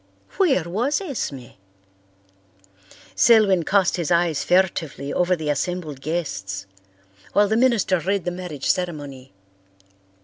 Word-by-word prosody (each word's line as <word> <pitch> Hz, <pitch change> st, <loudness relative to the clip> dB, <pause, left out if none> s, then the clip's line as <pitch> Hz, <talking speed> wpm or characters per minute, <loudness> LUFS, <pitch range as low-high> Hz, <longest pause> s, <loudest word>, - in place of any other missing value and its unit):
Where 310 Hz, -, +3 dB
was 230 Hz, -, -1 dB
Esme? 170 Hz, -, -5 dB, 1.6 s
Selwyn 210 Hz, -6 st, +5 dB
cast 190 Hz, +2 st, +2 dB
his 170 Hz, -2 st, -2 dB
eyes 170 Hz, -3 st, +1 dB
furtively 165 Hz, -6 st, 0 dB
over 180 Hz, +1 st, +2 dB
the 155 Hz, -3 st, -2 dB
assembled 155 Hz, -2 st, -3 dB
guests 100 Hz, -, -4 dB, 0.7 s
while 205 Hz, 0 st, +4 dB
the 220 Hz, -, 0 dB
minister 230 Hz, -6 st, +2 dB
read 195 Hz, +2 st, -1 dB
the 175 Hz, -, -1 dB
marriage 175 Hz, -6 st, -7 dB
ceremony. 145 Hz, -7 st, -3 dB
175 Hz, 110 wpm, -22 LUFS, 150-195 Hz, 1.6 s, Selwyn